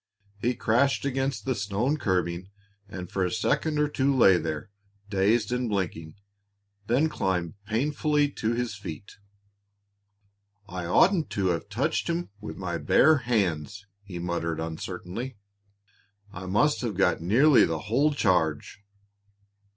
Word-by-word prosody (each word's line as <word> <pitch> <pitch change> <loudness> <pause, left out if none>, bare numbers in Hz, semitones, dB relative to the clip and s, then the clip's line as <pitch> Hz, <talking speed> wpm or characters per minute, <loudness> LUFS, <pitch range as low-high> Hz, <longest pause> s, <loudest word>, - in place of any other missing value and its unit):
He 120 +3 0
crashed 135 +6 +1
against 135 0 -2
the 130 - +1
stone 105 +6 -1
curbing 90 - -1 0.4
and 90 -2 -7
for 95 - -1
a 90 - +1
second 150 - 0
or 150 0 +2
two 140 -1 +1
lay 95 -7 +6
there, 80 +2 -4 0.4
dazed 105 +3 +2
and 125 -1 -1
blinking, 80 -5 -3 0.7
then 135 +7 +3
climbed 90 - -2
painfully 145 +5 +1
to 110 -3 -1
his 120 -2 -2
feet. 100 -3 -9 1.5
"I 90 -3 -5
oughtn't 170 - +3
to 95 -2 +2
have 85 +4 -2
touched 115 +10 -1
him 170 -8 -2
with 105 - -8
my - - -3
bare 155 0 +5
hands," 100 - -1 0.2
he 95 -3 -9
muttered 85 -2 -2
uncertainly. 90 +8 -5 1.0
"I 95 +1 -7
must 120 +11 +2
have 115 -7 -3
got 90 -4 +2
nearly 130 - +5
the 80 -1 -1
whole 135 +8 +2
charge!" 90 - 0
105 Hz, 135 wpm, -27 LUFS, 90-130 Hz, 1.5 s, lay